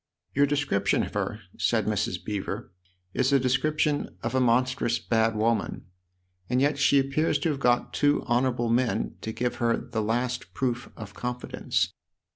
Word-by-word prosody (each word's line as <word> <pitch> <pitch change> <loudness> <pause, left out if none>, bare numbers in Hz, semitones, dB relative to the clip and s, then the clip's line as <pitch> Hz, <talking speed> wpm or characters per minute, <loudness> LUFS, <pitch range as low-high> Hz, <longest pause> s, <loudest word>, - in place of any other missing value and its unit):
" - - -50
Your 145 +1 +4
description 145 -8 +1
of - - -6
her," 105 - -2 0.2
said 110 -3 +2
Mrs. 100 -4 -1
Beever, 100 -5 -4 0.2
" 90 0 -43
is 130 +1 +2
a 140 - +5
description 145 - 0
of 120 +1 -2
a 130 - +3
monstrous 125 -1 +2
bad 115 -1 +1
woman. 110 -1 0 0.6
And 125 +1 +2
yet 140 +1 +2
she 140 0 +5
appears 140 +3 +2
to 145 +3 -1
have 145 -3 -2
got 120 -2 +2
two 145 0 +2
honourable 120 -1 +1
men 115 -3 0
to 110 - -4
give 125 +2 -2
her 115 -1 +2
the 110 - -3
last 120 +3 -2
proof 125 -2 -1
of 105 -3 -8
confidence." 125 +2 -2
125 Hz, 170 wpm, -27 LUFS, 110-135 Hz, 0.6 s, a